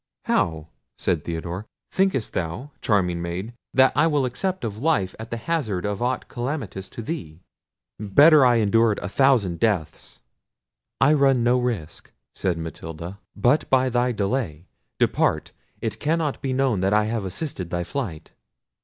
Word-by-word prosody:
"How!" 80 -1 0 0.3
said 85 -4 0
Theodore; 85 +4 -5 0.2
"thinkest 190 - +1
thou, 85 - -4
charming 90 -5 +1
maid, 90 +7 -4 0.2
that 130 0 +5
I 150 +2 +4
will 145 -4 +2
accept 185 +9 -2
of 110 -2 -4
life 130 - +1
at 110 +1 -7
the 115 - -3
hazard 115 - -2
of 105 +1 -2
aught 125 +1 -1
calamitous 120 -6 -4
to 115 - -7
thee? 100 - -6 0.6
Better 145 +9 +6
I 125 -1 +5
endured 115 0 +3
a - - -4
thousand 105 -7 +2
deaths." 95 -9 -2 0.8
"I 150 - +5
run 135 -4 +3
no 125 +1 +3
risk," 115 -11 -4 0.2
said 90 -3 -1
Matilda, 80 +3 -7 0.2
"but 125 +8 +2
by 130 -1 +3
thy 125 +1 +1
delay. 100 - -2 0.3
Depart; - - +1 0.3
it 110 -1 -3
cannot 155 -1 0
be 135 - -2
known 130 -7 +1
that 95 +1 +2
I 105 - +4
have 110 -1 -2
assisted 95 - -5
thy 85 -1 -2
flight." 95 - -5
115 Hz, 155 wpm, -24 LUFS, 90-135 Hz, 0.8 s, Better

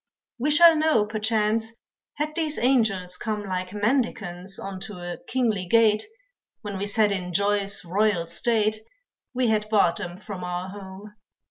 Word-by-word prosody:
We 275 +5 0
shall 330 +2 +7
know, 310 -9 +3
perchance, 215 +1 0 0.4
had 300 +1 -2
these 310 -2 -2
angels 215 -8 +1
come 215 -2 -3
Like 185 -2 -4
mendicants 205 -5 -1
unto 195 +2 -6
a 175 0 -7
kingly 220 -8 0
gate 215 +1 +4 0.6
When 200 -2 -5
we 200 - -2
sat 210 0 +3
in 180 -2 -3
joy's 200 0 +1
royal 190 -1 +1
state, 215 +5 +1 0.6
We 250 -2 +2
had 215 -1 0
barred 200 -6 +3
them 180 -3 -5
from 200 -2 -8
our 180 +1 -4
home. 200 +1 -10
210 Hz, 145 wpm, -25 LUFS, 190-225 Hz, 0.6 s, shall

